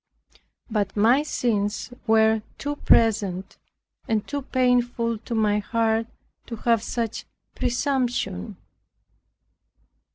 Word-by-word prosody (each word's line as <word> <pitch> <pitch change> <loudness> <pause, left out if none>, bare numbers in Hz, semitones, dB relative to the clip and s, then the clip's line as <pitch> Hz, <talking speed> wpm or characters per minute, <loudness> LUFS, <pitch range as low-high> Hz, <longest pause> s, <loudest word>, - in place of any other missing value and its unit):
But 210 -3 -2
my 235 +7 +5
sins 220 -5 -1
were 220 0 +4 0.2
too 290 +1 -3
present 200 -7 +2 0.5
and 220 -2 0
too 285 0 -3
painful 245 -3 +1
to 230 +1 -5
my 210 -1 +2
heart 225 +1 0 0.4
to 235 - -5
have 230 0 +2
such 230 -1 -3 0.3
presumption. 245 - -1
225 Hz, 95 wpm, -24 LUFS, 210-245 Hz, 0.5 s, my